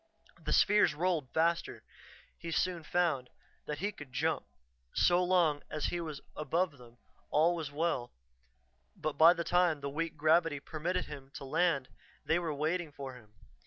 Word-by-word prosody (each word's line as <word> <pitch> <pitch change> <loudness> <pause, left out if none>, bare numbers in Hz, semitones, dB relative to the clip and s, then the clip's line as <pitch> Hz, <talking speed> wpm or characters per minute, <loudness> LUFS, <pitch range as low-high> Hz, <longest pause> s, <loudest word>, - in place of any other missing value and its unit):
The - - -3
spheres 205 -7 +4
rolled 165 -5 0
faster, 170 +1 0 0.5
he 170 - -8
soon 175 +1 0
found, 155 -7 0 0.4
than 150 - -3
he 200 +6 -1
could 150 -8 -11
jump; - - -1 0.5
so 180 +1 +4
long 175 -5 +3
as 155 - -3
he 175 - -1
was 155 -4 -6
above 155 0 -1
them, 120 -1 -16 0.3
all 165 +3 +3
was 160 -4 -4
well, 145 -5 -1 0.8
but 155 -1 -3
by 160 +4 +7
the 170 -1 -3
time 175 -3 +2
the 140 0 -4
weak 165 +2 -3
gravity 155 0 +3
permitted 165 +5 -2
him 140 -2 -9
to - - -7
land, 140 -2 +1 0.4
they 160 - +2
were 170 -3 -2
waiting 155 +3 -1
for 135 -2 -7
him. 110 -4 -16
160 Hz, 160 wpm, -32 LUFS, 145-175 Hz, 0.8 s, by